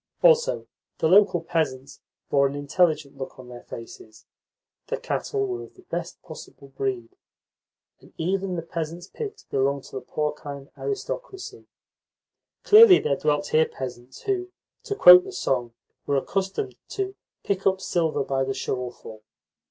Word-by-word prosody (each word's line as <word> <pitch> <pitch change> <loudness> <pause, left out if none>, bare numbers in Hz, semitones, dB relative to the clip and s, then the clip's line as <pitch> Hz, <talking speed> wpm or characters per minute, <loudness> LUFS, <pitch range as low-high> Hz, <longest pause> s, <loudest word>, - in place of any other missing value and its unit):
Also, 485 0 +4 0.3
the - - +1
local 190 -1 +5
peasants 140 -5 -2 0.3
bore 140 -1 +4
an 140 - -5
intelligent 145 0 +1
look 135 - -7
on 125 -1 -12
their 120 -1 -9
faces, 110 -1 -11 0.6
the - - -2
cattle 410 -2 -2
were 370 -1 -4
of - - -12
the 370 - -18
best 170 -1 -4
possible 155 -4 -12
breed, 130 -3 -4 0.8
and - - -19
even 185 +2 -1
the 165 - -3
peasants' 165 +1 -5
pigs 430 - -7
belonged 140 0 0
to - - -14
the - - -5
porcine 140 0 -4
aristocracy. 410 -1 -5 1.0
Clearly 425 -3 +9
there 140 - 0
dwelt 145 +1 0
here 160 0 +4
peasants 125 -1 -8
who, 370 -2 -1 0.4
to 410 - -2
quote 180 - +10
the - - -8
song, 120 -3 -2 0.3
were 140 - +2
accustomed 190 -5 -2
to 390 -1 -3 0.3
"pick 195 -1 0
up 190 0 +2
silver 165 -6 0
by 135 0 0
the 135 0 -2
shovelful." 120 -4 -5
155 Hz, 145 wpm, -25 LUFS, 135-195 Hz, 1.0 s, quote